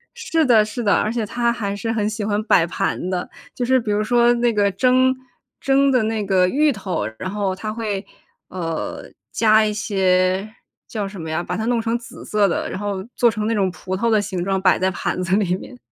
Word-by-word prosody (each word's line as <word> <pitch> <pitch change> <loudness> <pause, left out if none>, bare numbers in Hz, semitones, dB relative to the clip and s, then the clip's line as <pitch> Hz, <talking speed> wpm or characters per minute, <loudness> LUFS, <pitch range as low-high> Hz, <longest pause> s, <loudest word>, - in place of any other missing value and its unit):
是 325 -1 0
的， 225 -5 +5
是 230 +3 -5
的， 205 -3 +3
而 215 - 0
且 235 -2 -1
她 235 +2 0
还 200 -4 -3
是 225 +3 -3
很 215 -2 0
喜 215 -1 -4
欢 205 0 0
摆 170 - +4
盘 175 +1 -2
的。 180 -1 -3 0.2
就 250 - -3
是 260 +1 +3
比 225 -3 -3
如 205 +1 +1
说 240 +1 +4
那 240 0 +1
个 205 -2 +2
蒸 255 +5 +3 0.5
蒸 275 0 +3
的 250 -2 +3
那 220 -1 -1
个 185 -2 +3
芋 295 +8 +3
头， 190 - -3 0.2
然 185 - -4
后 200 -1 -1
她 215 +3 -5
会， 215 -3 -3 0.4
呃， 165 -3 -4 0.3
加 220 -1 +4
一 210 - -1
些 190 -1 +1 0.4
叫 210 -3 -3
什 195 -3 -8
么 160 - -6
呀， 160 +2 -1
把 - - -4
它 220 - -2
弄 240 0 +1
成 230 +1 0
紫 230 - -12
色 210 -1 +2
的， 170 - -2
然 - - -5
后 200 -2 -3
做 240 - +5
成 215 -2 -3
那 230 - +1
种 195 -4 +1
葡 185 +1 -5
萄 230 +3 +1
的 215 -2 +3
形 190 -3 -4
状， 195 -1 0
摆 185 - +4
在 190 - +2
盘 185 0 -3
子 185 +2 +1
里 190 -4 +1
面。 250 +6 -11
210 Hz, 245 characters per minute, -21 LUFS, 190-235 Hz, 0.5 s, 的